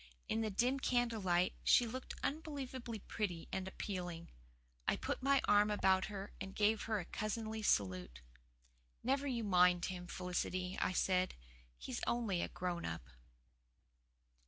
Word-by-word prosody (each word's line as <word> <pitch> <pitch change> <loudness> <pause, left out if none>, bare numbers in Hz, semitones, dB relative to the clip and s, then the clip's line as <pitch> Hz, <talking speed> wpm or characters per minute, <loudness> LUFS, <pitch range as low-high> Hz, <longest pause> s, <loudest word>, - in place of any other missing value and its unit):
In 225 - 0
the 220 - 0
dim 245 +7 +2
candle 240 -4 +1
light 180 -1 +2
she 245 - +6
looked 255 +3 -5
unbelievably 265 -7 -3
pretty 180 -7 -2
and 190 0 -2
appealing. 180 -3 -5 0.6
I - - +4
put - - -3
my 275 +1 +4
arm 205 0 +5
about 190 -2 +3
her 200 -1 -6
and 195 0 -5
gave 215 +1 +3
her 220 -2 0
a 175 - -5
cousinly 220 +2 -3
salute. 90 - +1 0.8
"Never 275 +3 +1
you 240 -4 -1
mind 180 -3 +5
him, 180 -1 -5
Felicity," 180 +1 -2
I - - +2
said. 185 0 +2 0.4
"He's - - -5
only 220 -7 +1
a - - 0
grown 175 -1 -3
up." 75 -6 -5
200 Hz, 145 wpm, -37 LUFS, 180-230 Hz, 0.8 s, she